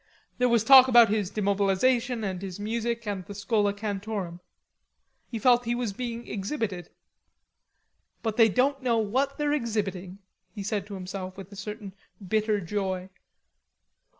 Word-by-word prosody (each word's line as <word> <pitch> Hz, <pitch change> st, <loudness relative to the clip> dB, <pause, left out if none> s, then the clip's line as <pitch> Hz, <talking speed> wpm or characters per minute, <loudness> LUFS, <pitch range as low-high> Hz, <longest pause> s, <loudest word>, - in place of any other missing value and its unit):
There 250 Hz, 0 st, +3 dB
was 235 Hz, -2 st, +3 dB
talk 260 Hz, 0 st, +9 dB
about 240 Hz, -3 st, +7 dB
his 205 Hz, -3 st, 0 dB
demobilization, 215 Hz, +4 st, +1 dB
and 190 Hz, -3 st, -3 dB
his 190 Hz, -1 st, -6 dB
music, 235 Hz, +2 st, -2 dB
and 200 Hz, -3 st, -3 dB
the 205 Hz, -, -10 dB
Schola 205 Hz, 0 st, +1 dB
Cantorum. 200 Hz, -3 st, -4 dB, 0.9 s
He 230 Hz, -, -4 dB
felt 245 Hz, +2 st, +4 dB
he 235 Hz, +1 st, 0 dB
was 240 Hz, -4 st, -2 dB
being 235 Hz, +1 st, -5 dB
exhibited. 200 Hz, -, -4 dB, 1.3 s
"But 220 Hz, -2 st, -1 dB
they 225 Hz, -1 st, +6 dB
don't 270 Hz, +6 st, +1 dB
know 240 Hz, -3 st, +1 dB
what 260 Hz, +6 st, 0 dB
they're 295 Hz, 0 st, 0 dB
exhibiting," 200 Hz, -8 st, -2 dB, 0.4 s
he 200 Hz, -, -5 dB
said 205 Hz, -1 st, -2 dB
to 205 Hz, -, -7 dB
himself 185 Hz, 0 st, -6 dB
with 195 Hz, 0 st, -10 dB
a -, -, -10 dB
certain 210 Hz, -1 st, -7 dB, 0.3 s
bitter 215 Hz, +1 st, +1 dB
joy. 190 Hz, 0 st, -3 dB
210 Hz, 150 wpm, -27 LUFS, 195-235 Hz, 1.3 s, talk